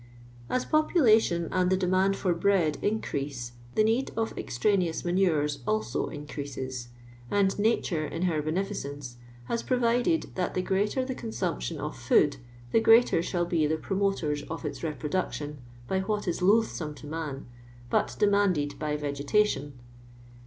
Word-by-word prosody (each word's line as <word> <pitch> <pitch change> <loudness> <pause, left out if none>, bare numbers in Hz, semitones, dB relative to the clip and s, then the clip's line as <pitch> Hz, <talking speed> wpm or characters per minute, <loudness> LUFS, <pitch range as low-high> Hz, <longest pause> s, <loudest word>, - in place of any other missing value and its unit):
As 255 - 0
population 225 - +3
and 180 -1 +2
the 190 - +3
demand 185 +1 +2
for 185 -3 0
bread 170 -4 +2
increase, 140 - -2 0.2
the 215 - +4
need 230 +5 +1
of 225 0 -1
extraneous 180 - 0
manures 160 -6 +1
also 110 +2 0
increases; 135 -4 -6 0.4
and 200 +2 +2
Nature 205 -7 +1
in 165 +4 -4
her 165 -4 +1
beneficence 145 -6 -4 0.3
has 230 - -2
provided 245 +5 +1
that 180 -1 -2
the 185 - 0
greater 205 +8 0
the 260 - -3
c«>nsumption 185 -8 -3
of 150 +1 -4
food, 135 +3 +3 0.3
the - - +5
greater 225 -6 +5
shall 175 0 -1
be 165 -3 +1
the 160 +1 0
promoters 190 -5 -1
of 165 - -5
its - - -4
reproduction 150 -1 -3 0.3
by 190 - 0
what 205 +1 -2
is 175 - -1
loath 215 +5 +4
some 150 -3 -5
to 150 - -12
man, 150 -3 -5 0.5
but - - +1
demanded 190 -8 +2
by 150 -1 -1
vegetation. 145 0 0
175 Hz, 145 wpm, -28 LUFS, 150-205 Hz, 0.5 s, the